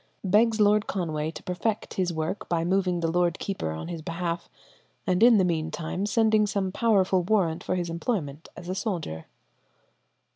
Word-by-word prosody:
Begs 220 +3 +3
Lord 210 0 +4
Conway 155 -5 -2
to 165 - -9
perfect 205 +4 -2
his 180 -2 0
work 160 +4 -3
by 170 -1 +1
moving 180 -1 +1
the 165 - +1
lord 175 -1 +1
keeper 190 - -3
in 80 - -6
his 170 -2 -5
behalf, 170 +1 -3 0.6
and 185 -2 +1
in 235 -1 +7
the 190 - +4
mean 160 -2 0
time 175 +5 -3
sending 215 -1 +3
some 195 -2 -1
powerful 195 -4 +2
warrant 180 -4 +1
for 185 - -1
his 175 -1 -2
employment 165 - -3
as 175 - -9
a 185 - -2
soldier." 175 - -4
180 Hz, 175 wpm, -26 LUFS, 165-205 Hz, 0.6 s, in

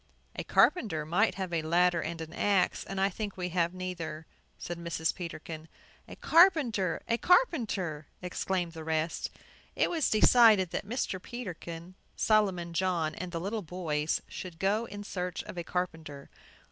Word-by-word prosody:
"A - - -3
carpenter 180 - +3
might 185 +5 +2
have 185 -2 -4
a 165 - +1
ladder 170 +2 +3
and 165 +1 -4
an 160 0 -7
axe, 200 -2 +1
and 195 0 -5
I 195 - +4
think 200 +1 -5
we 180 -1 -2
have 170 -1 +1
neither," 170 -4 -5 0.3
said 175 0 -6
Mrs. 170 -1 -1
Peterkin. 160 -2 -7 0.4
"A - - -9
carpenter! 285 - +4
A 230 0 +1
carpenter!" 215 - +2
exclaimed 180 -1 -2
the 160 -1 -8
rest. 160 +1 -1 0.5
It - - +2
was 325 -4 +1
decided 215 -4 +6
that - - -3
Mr. 225 -6 -2
Peterkin, 180 -7 -7 0.2
Solomon 190 -6 +2
John, 170 -3 0
and 175 +3 -6
the 165 - -3
little 205 +5 -3
boys 160 -4 -2
should 180 -3 -8
go 205 +6 +1
in 205 -2 -8
search 180 -3 -4
of - - -9
a 175 - -4
carpenter. 160 -6 -4
180 Hz, 160 wpm, -30 LUFS, 165-205 Hz, 0.5 s, decided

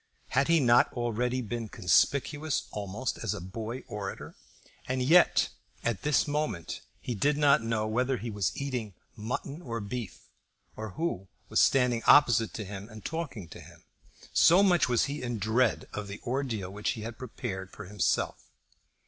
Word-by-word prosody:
Had 135 +2 +2
he 165 0 +5
not 120 -3 +5
already 125 +1 -1
been 115 0 -4
conspicuous 140 - +1
almost 105 +5 -4
as 115 - -2
a - - -5
boy 110 +7 -6
orator? 100 -2 -6 0.5
And 130 0 0
yet, 170 +7 +5 0.3
at 120 -4 -1
this 150 0 +2
moment 145 - -2 0.2
he 125 - -4
did 145 +7 +1
not 145 -4 +5
know 115 -1 -1
whether 125 +4 0
he 115 0 -5
was 100 -6 0
eating 125 -8 -3 0.2
mutton 125 +7 -4
or 115 -7 -4
beef, 105 -1 -6 0.5
or 110 -3 -6
who 155 - -2 0.2
was - - +2
standing 125 -3 +4
opposite 115 -6 +6
to 110 - -4
him 100 +2 -8
and 110 -1 -12
talking 150 - -4
to - - -10
him, - - -16 0.5
so 180 +4 +6
much 175 -8 +4
was 120 -2 +3
he 145 +1 -4
in 120 -2 -3
dread 110 +4 +1
of 105 -1 -4
the 100 +1 -7
ordeal 120 -7 -2
which 105 +2 -1
he 115 - -7
had 115 +2 -7
prepared 100 -7 -5
for - - -9
himself. 100 +1 0
120 Hz, 165 wpm, -29 LUFS, 105-135 Hz, 0.5 s, opposite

